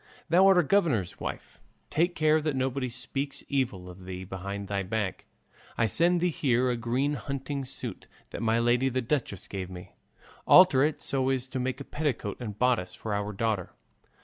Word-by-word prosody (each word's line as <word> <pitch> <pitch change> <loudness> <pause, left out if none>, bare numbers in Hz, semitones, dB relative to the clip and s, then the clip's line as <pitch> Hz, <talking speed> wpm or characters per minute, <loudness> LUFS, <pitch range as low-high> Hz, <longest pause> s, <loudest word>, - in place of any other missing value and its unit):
Thou 180 +4 +6
art 195 -1 +6
a 180 - +5
governor's 145 - +1
wife; - - -6 0.3
take 175 +3 +1
care 155 0 +3
that 150 -2 -1
nobody 130 0 -1
speaks 135 +3 -4
evil 120 -10 -1
of 90 +1 -11
thee 95 0 -6
behind 100 +2 -5
thy 100 0 -1
back. 100 0 -3 0.5
I 115 - +3
send 170 - +3
thee 180 - +3
here 125 -4 +2
a - - 0
green 125 +5 0
hunting 140 -1 -4
suit 125 -5 -6 0.2
that - - -5
my 115 0 +2
lady 120 +3 +3
the 130 0 -1
duchess 120 - -2
gave 95 -2 -5
me; 90 -1 -10 0.6
alter 180 -8 +8
it 150 +2 +1
so 135 -1 0
as 130 -1 0
to 130 - -3
make 130 +1 -2
a - - -5
petticoat 140 -10 -2
and 105 -4 -5
bodice 120 -7 +1
for 110 - -4
our 105 0 -1
daughter. 105 -3 -2
125 Hz, 185 wpm, -28 LUFS, 105-140 Hz, 0.6 s, alter